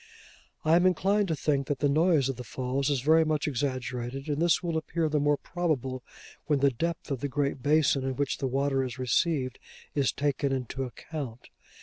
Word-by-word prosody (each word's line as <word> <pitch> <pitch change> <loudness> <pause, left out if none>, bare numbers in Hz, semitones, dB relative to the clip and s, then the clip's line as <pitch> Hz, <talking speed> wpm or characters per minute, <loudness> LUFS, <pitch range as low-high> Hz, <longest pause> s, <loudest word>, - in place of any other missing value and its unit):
I 160 +1 +5
am 180 +1 +4
inclined 195 +3 +2
to 160 - 0
think 140 -2 0
that 145 - -1
the 145 - +2
noise 155 -1 +3
of 135 - -2
the 125 - -7
Falls 130 +3 -2
is 140 -4 +1
very 160 +4 +5
much 155 -1 0
exaggerated; 130 0 -3
and 145 +1 -1
this 170 +1 +3
will 170 -2 -1
appear 160 +1 -1
the 150 -1 +1
more 145 0 +2
probable 135 -9 -2 0.4
when 150 -2 +3
the 140 0 +3
depth 165 +5 -3
of 135 - -1
the 145 - -2
great 140 0 -1
basin 145 -2 +3
in 135 0 -2
which 140 +1 -1
the 135 - 0
water 135 +1 +1
is 125 -2 -5
received, 130 +2 0 0.3
is 140 -3 +2
taken 140 -1 0
into 130 0 -2
account. 125 -1 -7
140 Hz, 200 wpm, -28 LUFS, 130-155 Hz, 0.4 s, I